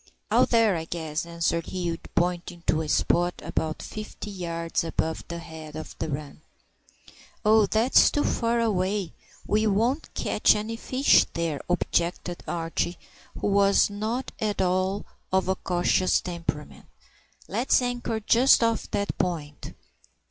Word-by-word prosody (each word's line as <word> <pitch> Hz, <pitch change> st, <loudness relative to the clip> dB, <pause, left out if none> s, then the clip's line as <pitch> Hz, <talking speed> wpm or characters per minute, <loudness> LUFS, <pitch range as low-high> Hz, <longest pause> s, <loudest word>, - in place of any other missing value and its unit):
"Out -, -, +4 dB
there, 225 Hz, -4 st, +4 dB
I 160 Hz, -1 st, -3 dB
guess," 160 Hz, -1 st, -4 dB
answered 170 Hz, 0 st, -1 dB
Hugh, 175 Hz, -3 st, -3 dB, 0.2 s
pointing 175 Hz, 0 st, -1 dB
to 160 Hz, -, +2 dB
a 155 Hz, -, -4 dB
spot 175 Hz, +3 st, +2 dB
about 155 Hz, -1 st, -2 dB
fifty 215 Hz, -1 st, -7 dB
yards 170 Hz, -2 st, -2 dB
above 160 Hz, -1 st, -2 dB
the 170 Hz, -, -5 dB
head 160 Hz, -2 st, -9 dB
of 155 Hz, -, -7 dB
the -, -, -2 dB
run. 145 Hz, +1 st, -6 dB, 1.0 s
"Oh, 215 Hz, -1 st, +5 dB
that's 225 Hz, +4 st, +5 dB
too 290 Hz, -, 0 dB
far 235 Hz, 0 st, +1 dB
away; 200 Hz, -4 st, 0 dB, 0.3 s
we 215 Hz, +1 st, +2 dB
won't 235 Hz, +9 st, 0 dB
catch -, -, +3 dB
any 215 Hz, +2 st, -3 dB
fish 255 Hz, +4 st, +3 dB
there," 165 Hz, -4 st, -2 dB
objected 175 Hz, 0 st, -1 dB
Archie, 165 Hz, +1 st, -2 dB, 0.4 s
who -, -, -3 dB
was 200 Hz, 0 st, +4 dB
not 220 Hz, +5 st, -3 dB
at 210 Hz, -1 st, -1 dB
all 185 Hz, +2 st, 0 dB, 0.3 s
of 190 Hz, 0 st, +2 dB
a 190 Hz, -, +3 dB
cautious 185 Hz, +1 st, +1 dB
temperament. 170 Hz, -4 st, -5 dB, 0.6 s
"Let's 225 Hz, -, +2 dB
anchor 245 Hz, -3 st, -2 dB
just 235 Hz, +4 st, +5 dB
off 230 Hz, -1 st, 0 dB
that 200 Hz, -, -2 dB
point." 155 Hz, -5 st, -3 dB
185 Hz, 140 wpm, -26 LUFS, 170-215 Hz, 1.0 s, Oh